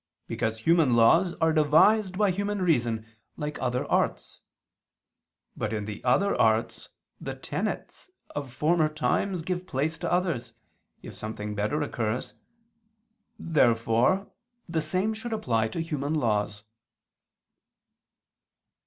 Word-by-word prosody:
Because 110 -1 -2
human 160 -4 +4
laws 165 +10 +4
are 160 0 +2
devised 185 +6 +4
by 205 -2 +3
human 200 +1 -2
reason, 120 -10 +1 0.3
like 150 0 -4
other 125 0 -1
arts. - - -1 1.1
But 110 - -3
in 105 -2 -2
the 105 -1 -7
other 195 +11 +3
arts, 110 0 +1 0.3
the - - -5
tenets - - -4 0.3
of 140 -3 -4
former 155 +4 +2
times 165 +3 -1
give 180 +1 -3
place 155 +2 -2
to - - -3
others, 165 -10 -1 0.5
if - - -8
something 105 -1 -5
better 105 +9 -1
occurs. 115 -3 -3 1.0
Therefore 125 - +2 0.4
the 165 -2 -1
same 185 +8 0
should 225 +2 -5
apply 115 - 0
to 110 - -5
human 150 -2 -2
laws. 105 -6 0
150 Hz, 120 wpm, -27 LUFS, 115-175 Hz, 1.1 s, human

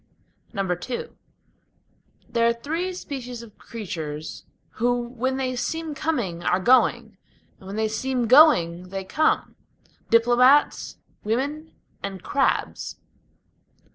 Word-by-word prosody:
II 195 +5 -2 1.2
There 235 0 +2
are 235 - +3
three 325 +10 -3
species 250 -9 -6
of 215 -3 -16
creatures 160 -9 -6 0.3
who 245 +1 +2
when 260 +2 -2
they 255 -1 -1
seem 320 +5 -3
coming 270 - -2
are 180 +1 +1
going, 240 -2 +3 0.4
When 195 +1 -8
they 220 0 +1
seem 245 +3 -1
going 185 - +5
they 195 0 -4
come: 305 +12 0 0.5
Diplomates, 245 +5 +4 0.3
women, 285 +8 -2 0.3
and 195 -2 -6
crabs. 280 -1 0
240 Hz, 105 wpm, -24 LUFS, 195-265 Hz, 1.2 s, going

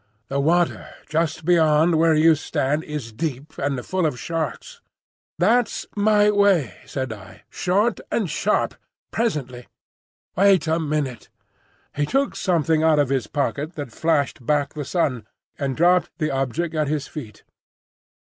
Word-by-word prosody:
"The 140 - -1
water 170 +4 +1 0.2
just 160 0 -1
beyond 160 -1 +4
where 160 0 +4
you 160 +1 +6
stand 150 0 -1
is 150 -7 -5
deep—and 140 -1 -3
full 185 -3 0
of 130 -5 -4
sharks." 165 -4 -4 0.6
"That's 220 +5 +2
my 210 0 +4
way," 195 - +3
said 130 -4 -3
I. 105 -3 -13
"Short 205 +5 +1
and 215 -5 0
sharp. 175 +7 0 0.4
Presently." 135 - -2 0.7
"Wait 195 -3 +4
a 160 +1 +1
minute." 150 -5 -3 0.7
He 145 0 0
took 275 - 0
something 165 -4 +1
out 160 -1 +4
of 145 -3 +2
his 130 -5 0
pocket 145 +2 -2
that 145 -5 -6
flashed 145 -3 0
back 145 +1 0
the 150 -2 -5
sun, 130 - -1 0.3
and 135 -2 -2
dropped 180 +2 +4
the 155 -3 -1
object 135 +5 -2
at 155 -2 0
his 150 -1 -2
feet. 115 -9 -9
155 Hz, 140 wpm, -22 LUFS, 140-175 Hz, 0.7 s, you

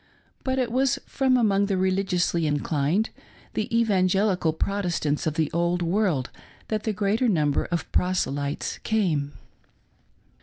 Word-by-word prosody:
But 260 0 -1
it 250 -3 0
was 265 +2 +2
from 265 -2 +2
among 200 -4 +2
the 195 -2 0
religiously 185 -3 +1
inclined 150 - 0 0.2
— - - -26
the 215 - -1
Evangelical 190 -4 +2
Protestants 170 -4 -1
of 155 - -1
the 160 -3 0
Old 170 +1 0
World 170 -7 0 0.4
that 215 -1 -2
the 220 - +1
greater 210 +4 +1
number 150 -8 +1
of 170 -1 -2
proselytes 145 -6 -1
came. 160 -10 0
185 Hz, 130 wpm, -25 LUFS, 160-215 Hz, 0.4 s, was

